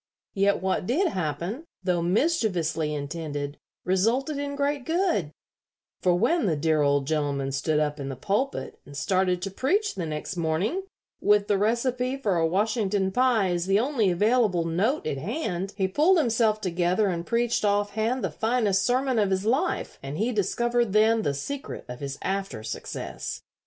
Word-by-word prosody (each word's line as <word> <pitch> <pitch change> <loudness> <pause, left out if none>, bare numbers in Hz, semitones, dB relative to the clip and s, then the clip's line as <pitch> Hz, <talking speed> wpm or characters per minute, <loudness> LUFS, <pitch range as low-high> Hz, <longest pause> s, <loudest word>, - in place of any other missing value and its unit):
Yet 200 -1 +2
what 190 -1 0
did 340 +9 +2
happen, 175 - -3 0.2
though 180 -2 +1
mischievously 180 - +1
intended, 145 -1 -4 0.3
resulted 235 - +1
in 285 0 -3
great 285 -1 0
good, 325 - 0 0.7
for 180 -1 +3
when 235 - +2
the 165 - +2
dear 155 +1 +1
old 140 -1 +2
gentleman 140 -2 -1
stood 150 +3 0
up 150 0 -1
in 140 -1 -4
the 135 - -4
pulpit 210 - -2
and 140 0 -11
started 185 +1 +1
to 195 - -3
preach 395 - +1
the 175 -4 -4
next 155 +4 -4
morning, 175 - -1 0.4
with 205 0 +3
the 205 - +3
recipe 250 +4 0
for 210 -9 0
a 165 -1 +3
Washington 200 +1 0
pie 240 -4 +3
as 175 0 -1
the 195 +1 +4
only 240 -5 +1
available 205 -2 +2
note 195 - 0
at 140 -3 -2
hand, 195 - -3
he 190 -2 +2
pulled 315 - +4
himself 225 -6 +2
together 180 +2 +1
and 170 -1 -3
preached 235 0 +1
off 205 0 +2
hand 225 +4 -1
the - - -1
finest 220 -4 +1
sermon 250 +2 +1
of 205 -2 +2
his 190 +1 0
life, 275 +11 0
and 140 +2 -5
he 225 +5 0
discovered 235 +1 0
then 220 +1 +4
the 145 -9 -1
secret 280 - -5
of 125 0 -7
his 140 -1 -5
after 195 - -3
success. 110 - -5
200 Hz, 170 wpm, -26 LUFS, 170-240 Hz, 0.7 s, the